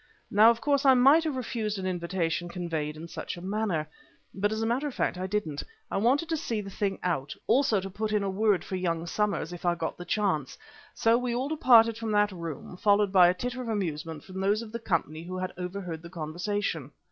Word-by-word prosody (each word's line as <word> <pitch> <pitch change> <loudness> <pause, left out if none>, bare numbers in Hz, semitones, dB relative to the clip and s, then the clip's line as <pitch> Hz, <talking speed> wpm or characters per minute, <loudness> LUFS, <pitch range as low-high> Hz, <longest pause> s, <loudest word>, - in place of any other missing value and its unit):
Now, 215 +3 +7
of 235 0 +1
course, 280 -1 +2
I 265 -2 +7
might 275 +6 +6
have 305 -4 -1
refused 220 -4 -2
an 190 - -4
invitation 175 -1 -1
conveyed 160 -4 -3
in 165 +2 -8
such 170 - -6
a - - -7
manner. 190 -5 -1 0.5
But, 205 +2 0
as 220 +1 -1
a - - +1
matter 250 +6 0
of 280 - -6
fact, - - 0
I 185 - -2
didn't. 185 -8 -2 0.3
I - - 0
wanted 260 +10 +2
to 325 - 0
see 230 -6 -2
the 195 -1 -6
thing 195 0 -1
out; 145 -6 -1
also 255 -6 +3
to 190 - -5
put 215 +3 -3
in 210 -1 +1
a - - -1
word 200 0 +2
for 190 - -5
young 170 -2 -1
Somers, 200 -2 -1
if 175 - -9
I 175 -1 +2
got 165 0 -4
the - - -5
chance. 185 -11 -1 0.4
So 230 +1 +3
we 250 -1 -2
all 260 +3 -1
departed 230 -7 +5
from 225 -1 -3
that 205 0 +3
room, 170 -1 -7
followed 205 0 +3
by 180 -2 +8
a 175 - +4
titter 250 +6 -4
of 245 - -6
amusement 160 -7 -3
from 190 0 -8
those 205 +3 +1
of 220 - -10
the 235 - -4
company 160 -7 -1
who 185 +2 -6
had 185 0 -3
overheard 180 -2 -5
the 170 - -10
conversation. 170 -1 -3
195 Hz, 230 wpm, -28 LUFS, 175-225 Hz, 0.5 s, by